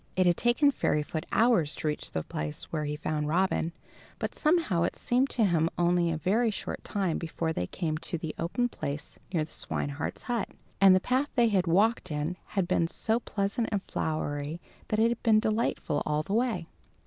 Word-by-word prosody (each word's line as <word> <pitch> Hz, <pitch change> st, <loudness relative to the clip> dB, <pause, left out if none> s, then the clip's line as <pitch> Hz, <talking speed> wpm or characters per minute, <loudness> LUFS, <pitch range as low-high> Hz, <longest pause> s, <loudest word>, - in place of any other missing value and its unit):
It 185 Hz, -, +3 dB
had 175 Hz, -1 st, +4 dB
taken 245 Hz, -, +3 dB
Fairyfoot 155 Hz, -, -1 dB
hours 220 Hz, -10 st, +3 dB
to -, -, -3 dB
reach 150 Hz, -, -2 dB
the 80 Hz, -, -3 dB
place 75 Hz, -1 st, -5 dB
where 155 Hz, -2 st, -1 dB
he 145 Hz, 0 st, -2 dB
found 150 Hz, 0 st, -2 dB
Robin, 170 Hz, 0 st, +1 dB, 0.5 s
but -, -, -3 dB
somehow 305 Hz, -, +2 dB
it 170 Hz, -, 0 dB
seemed 255 Hz, +3 st, +1 dB
to 225 Hz, -, +2 dB
him 165 Hz, -3 st, +2 dB
only 175 Hz, 0 st, +3 dB
a 160 Hz, -, -1 dB
very 215 Hz, +9 st, +2 dB
short 210 Hz, -, -5 dB
time 190 Hz, -5 st, -1 dB
before 165 Hz, 0 st, -2 dB
they 90 Hz, -, -2 dB
came 155 Hz, -, -2 dB
to 170 Hz, -, -3 dB
the 160 Hz, -1 st, -5 dB
open 215 Hz, +9 st, 0 dB
place 145 Hz, -10 st, -6 dB
near 165 Hz, -4 st, +1 dB
the 155 Hz, -, -10 dB
swineherd's 140 Hz, 0 st, -4 dB
hut; 240 Hz, -4 st, -1 dB, 0.3 s
and 195 Hz, -1 st, +8 dB
the -, -, +5 dB
path 260 Hz, +8 st, 0 dB
they 240 Hz, -3 st, +4 dB
had 190 Hz, -4 st, +2 dB
walked 210 Hz, +7 st, +3 dB
in 150 Hz, +3 st, -2 dB, 0.2 s
had 185 Hz, -3 st, +2 dB
been 170 Hz, -2 st, +2 dB
so 220 Hz, +6 st, 0 dB
pleasant 215 Hz, +1 st, -1 dB
and 200 Hz, -2 st, -1 dB
flowery 150 Hz, 0 st, -2 dB, 0.3 s
that 215 Hz, -, 0 dB
it 225 Hz, +1 st, +4 dB
had 235 Hz, -1 st, -2 dB
been 220 Hz, -2 st, +5 dB
delightful 215 Hz, -9 st, 0 dB
all 150 Hz, 0 st, 0 dB
the 195 Hz, -, -4 dB
way. 225 Hz, -7 st, +1 dB
180 Hz, 195 wpm, -29 LUFS, 155-225 Hz, 0.5 s, and